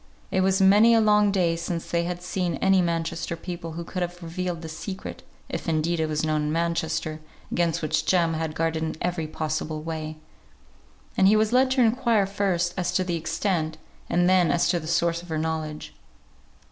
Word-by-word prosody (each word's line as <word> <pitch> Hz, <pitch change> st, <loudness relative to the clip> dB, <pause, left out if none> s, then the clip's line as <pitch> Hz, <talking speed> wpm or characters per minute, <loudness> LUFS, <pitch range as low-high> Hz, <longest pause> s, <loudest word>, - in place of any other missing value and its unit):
It 190 Hz, -, +2 dB
was 190 Hz, +1 st, +2 dB
many 205 Hz, +4 st, +6 dB
a -, -, +5 dB
long 210 Hz, -1 st, +4 dB
day 175 Hz, -4 st, +2 dB
since 170 Hz, 0 st, -4 dB
they 170 Hz, 0 st, +1 dB
had 175 Hz, 0 st, -4 dB
seen 180 Hz, -2 st, -1 dB
any 190 Hz, -1 st, +3 dB
Manchester 165 Hz, -1 st, -2 dB
people 170 Hz, -1 st, -6 dB
who 170 Hz, +1 st, -5 dB
could 180 Hz, +2 st, -5 dB
have 175 Hz, 0 st, -4 dB
revealed 175 Hz, 0 st, -4 dB
the -, -, -5 dB
secret 185 Hz, +4 st, -7 dB, 0.3 s
(if -, -, -4 dB
indeed 165 Hz, +1 st, 0 dB
it 160 Hz, -, +1 dB
was 155 Hz, 0 st, -1 dB
known 155 Hz, -1 st, +1 dB
in 150 Hz, 0 st, -1 dB
Manchester, 160 Hz, -1 st, -1 dB, 0.3 s
against 170 Hz, -2 st, 0 dB
which 155 Hz, -, 0 dB
Jem 170 Hz, -3 st, +3 dB
had 160 Hz, -1 st, -3 dB
guarded 160 Hz, 0 st, 0 dB
in 160 Hz, 0 st, -2 dB
every 175 Hz, -3 st, -2 dB
possible 155 Hz, 0 st, -3 dB
way). 155 Hz, -1 st, -5 dB, 1.0 s
And 190 Hz, -, +5 dB
he 210 Hz, -, +6 dB
was 215 Hz, +1 st, +2 dB
led 260 Hz, +1 st, +4 dB
to 260 Hz, -, +2 dB
inquire 230 Hz, -3 st, +3 dB
first 190 Hz, -3 st, 0 dB
as 180 Hz, -1 st, 0 dB
to 185 Hz, -, +2 dB
the 175 Hz, -2 st, -2 dB
extent, 165 Hz, -1 st, -1 dB, 0.3 s
and 175 Hz, +1 st, +3 dB
then 185 Hz, -2 st, +4 dB
as 170 Hz, -, +2 dB
to 175 Hz, -1 st, +2 dB
the 155 Hz, -, -8 dB
source 170 Hz, 0 st, +1 dB
of 175 Hz, -, -14 dB
her 160 Hz, -, -1 dB
knowledge. 155 Hz, -1 st, -3 dB
170 Hz, 195 wpm, -25 LUFS, 160-185 Hz, 1.0 s, many